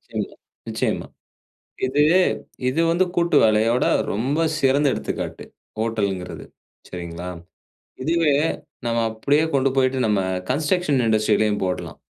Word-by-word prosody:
நிச்சயமா, - - -3 0.3
நிச்சயமா. - - -2 0.8
இது, 140 +3 +1 0.7
இது 150 +6 0
வந்து 175 +3 +3
கூட்டு 170 0 +2
வேலையோட 110 +3 +3 0.3
ரொம்ப 130 +9 -1 0.2
சிறந்த 140 +1 +3
எடுத்துக்காட்டு, 70 - -4 0.4
ஹோட்டல்ங்கிறது 100 -5 -2 0.4
சரிங்களா. 85 0 -6 0.7
இதுவே 165 +1 +2 0.5
நம்ம 115 0 0
அப்டியே 140 +8 +1
கொண்டு 135 0 +3
போயிட்டு 130 0 +2
நம்ம 105 -2 +2 0.3
கன்ஸ்ட்ரக்ஷன் 150 0 +1
இண்டஸ்ட்ரிலேயும் 110 -1 +2
போடலாம். 90 -1 -4
120 Hz, 105 wpm, -22 LUFS, 105-145 Hz, 0.8 s, வந்து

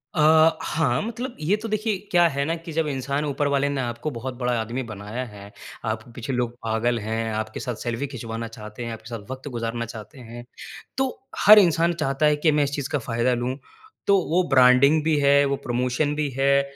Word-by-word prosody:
अ, 160 0 +5
हाँ, 160 0 0
मतलब 240 +3 -5
ये 160 +7 +2
तो 225 - -4
देखिए 215 -1 0
क्या 175 -1 +5
है 140 -3 -1
ना 165 +3 -1
कि 165 0 -9
जब 160 0 0
इंसान 140 +1 -2
ऊपर 145 0 -1
वाले 140 0 +1
ने 140 -1 -1
आपको 120 +4 -3
बहुत 130 +1 -5
बड़ा 125 -1 0
आदमी 115 +4 -3
बनाया 110 +2 -6
है, 100 -3 -12 0.3
आपके 110 +2 -4
पीछे 120 +3 -5
लोग 120 -1 -1
पागल 115 +2 0
हैं, 110 +1 -2
आपके 110 0 -4
साथ 125 -3 -4
सेल्फ़ी 120 +3 -2
खिंचवाना 115 -3 -6
चाहते 110 +1 -8
हैं, 115 - -4
आपके 110 +1 -10
साथ 115 -4 -7
वक़्त 130 +2 -7
गुजारना 115 0 -3
चाहते 115 +5 -10
हैं, 120 0 -10 0.5
तो 265 0 +1 0.4
हर 210 +1 +10
इंसान 170 -2 +3
चाहता 150 -2 0
है 150 0 +4
कि 155 +2 +2
मैं 150 0 +2
इस 140 - -2
चीज़ 140 -2 -4
का 145 - +1
फ़ायदा 120 +1 0
लूँ। 125 +2 -2 0.5
तो 200 - +5
वो 180 +3 +3
ब्रांडिंग 135 +3 +5
भी 155 -1 +2
है, 140 0 +5
वो 140 0 0
प्रमोशन 125 +5 0
भी 150 -1 -1
है 140 +1 +4
135 Hz, 210 wpm, -24 LUFS, 115-155 Hz, 0.5 s, हर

